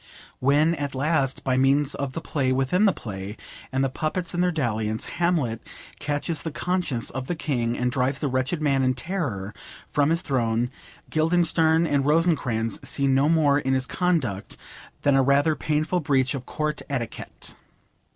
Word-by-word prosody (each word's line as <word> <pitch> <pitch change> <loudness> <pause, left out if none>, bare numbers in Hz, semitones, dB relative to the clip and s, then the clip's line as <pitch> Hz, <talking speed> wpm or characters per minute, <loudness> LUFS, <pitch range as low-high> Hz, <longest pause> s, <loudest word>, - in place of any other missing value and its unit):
When, 145 +5 +3
at 145 -4 -4
last, 140 -1 0
by 130 -1 +1
means 135 +2 +3
of 135 -1 -4
the 165 - -4
play 135 -5 -1
within 135 +10 +2
the 200 - +5
play, 100 - -7 0.3
and 135 0 +1
the - - +3
puppets 165 +5 -3
in 175 - 0
their 180 0 +3
dalliance, 110 -8 -1
Hamlet 160 -10 0 0.4
'catches 150 +2 -1
the 160 - -3
conscience' 165 -6 -2
of 130 0 -5
the 175 - -1
King, 120 -7 -1
and 125 0 0
drives 130 +1 0
the 145 - -1
wretched 130 +5 -1
man 140 -2 +2
in 130 -1 +2
terror 120 - -3 0.4
from 145 0 +2
his 165 +2 +1
throne, 120 -3 0 0.4
Guildenstern 165 0 +3
and 145 -4 +1
Rosencrantz 145 -8 +1
see 140 - -1
no 135 +2 +3
more 150 -3 +4
in 135 -1 0
his 130 -1 +1
conduct 140 - -1 0.5
than 145 - +4
a 135 - +5
rather 140 +4 +3
painful 155 +5 0
breach 135 -4 +1
of 130 -3 -6
Court 155 0 -2
etiquette. 125 -5 -5
140 Hz, 170 wpm, -25 LUFS, 130-160 Hz, 0.5 s, the